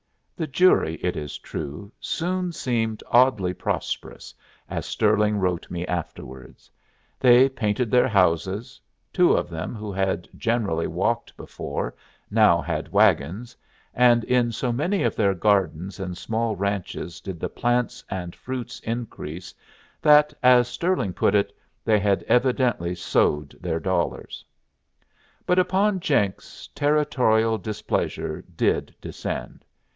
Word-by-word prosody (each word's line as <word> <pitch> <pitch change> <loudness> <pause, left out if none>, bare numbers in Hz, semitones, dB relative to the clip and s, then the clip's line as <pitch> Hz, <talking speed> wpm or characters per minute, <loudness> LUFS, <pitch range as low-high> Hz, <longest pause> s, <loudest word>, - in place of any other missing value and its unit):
The 160 -4 -3
jury, 145 - +3
it 90 0 0
is 75 -1 -5
true, 80 +8 -7
soon 180 +1 -2
seemed 115 -7 -2
oddly 120 -7 +4
prosperous, - - -4 0.3
as - - -4
Stirling 105 0 +2
wrote 90 -3 -1
me 85 0 -4
afterwards. 65 -7 -7 0.5
They 125 +1 +7
painted 115 -2 -1
their 125 0 +4
houses; 95 0 0 0.3
two - - +4
of - - -1
them, 80 +8 -5
who 105 -1 -6
had 95 -2 -1
generally 105 -9 0
walked - - -2
before, - - -5 0.4
now - - +5
had - - -4
wagons; 100 +12 +2 0.4
and 120 -1 +4
in 120 -1 +2
so 120 +2 -2
many 155 +8 0
of - - 0
their 100 -3 +2
gardens 95 -2 0
and 90 -2 -5
small 115 +2 -1
ranches 100 -3 -3
did 95 -5 -7
the - - -2
plants 120 -1 -1
and 90 -2 -5
fruits 130 -1 -6
increase 100 -7 -6 0.5
that, 150 0 +6
as 125 -1 +6
Stirling 125 - -1
put 100 - +2
it, 100 0 +1 0.3
they 110 -2 +4
had 100 -1 +1
evidently 125 -8 +1
sowed 75 -4 0
their - - -2
dollars. - - -2 1.0
But 180 +1 +3
upon 195 +2 +2
Jenks 100 - -1
Territorial 125 - +2
displeasure 110 -1 -3
did - - 0
descend. - - -6
110 Hz, 125 wpm, -24 LUFS, 90-125 Hz, 1.0 s, They